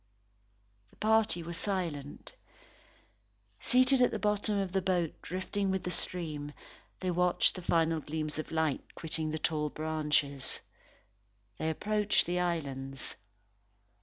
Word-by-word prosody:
The - - -23
party 215 -5 +3
were 170 +1 -5
silent. 165 -7 -3 1.3
Seated 255 +1 +5
at 245 - +6
the - - -2
bottom 210 0 +1
of 195 -2 -1
the 190 0 +1
boat 180 -3 +1
drifting 190 +2 -2
with 190 -1 0
the 180 - -2
stream, 150 -6 -3 0.5
they 185 -1 0
watched 180 0 +3
the 185 - -7
final 165 -2 +2
gleams 155 0 -3
of 155 - -4
light 160 -3 -1
quitting 160 -1 -2
the 155 - -2
tall 150 -1 0
branches. 150 -3 -1 1.0
They 160 - 0
approached 210 +5 +2
the 180 +1 0
islands. 135 -6 -2
170 Hz, 130 wpm, -31 LUFS, 155-190 Hz, 1.3 s, at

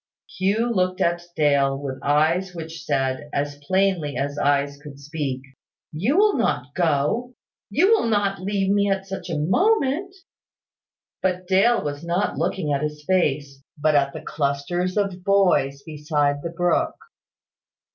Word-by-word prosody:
Hugh 210 +6 +1
looked 185 -2 0
at 170 0 +1
Dale, 140 -3 +2
with 135 -2 -5
eyes 165 +6 +1
which 160 -2 -7
said, 135 +2 -1
as 145 0 -2
plainly 185 -6 +1
as 140 +1 -2
eyes 140 0 +1
could 145 -2 -11
speak, 140 -3 -4 0.5
"You 210 - 0
will 420 0 +4
not 145 - -1
go 175 - 0 0.3
you 340 - +3
will 445 - +3
not 200 -3 0
leave 195 0 0
me 200 0 +2
at 195 0 -1
such 195 -1 -6
a 165 - -1
moment?" 350 - +1 1.1
But 185 -1 -1
Dale 195 +5 +3
was 145 0 -4
not 175 +4 -1
looking 155 -7 -1
at 140 - 0
his 150 0 -4
face, 145 -6 0 0.2
but 155 +1 +2
at 140 -1 +3
the - - -8
clusters 170 +6 -2
of 195 -3 -1
boys 180 -9 +2
beside 150 -2 -1
the 170 - -4
brook. 175 +1 0
170 Hz, 145 wpm, -23 LUFS, 145-195 Hz, 1.1 s, will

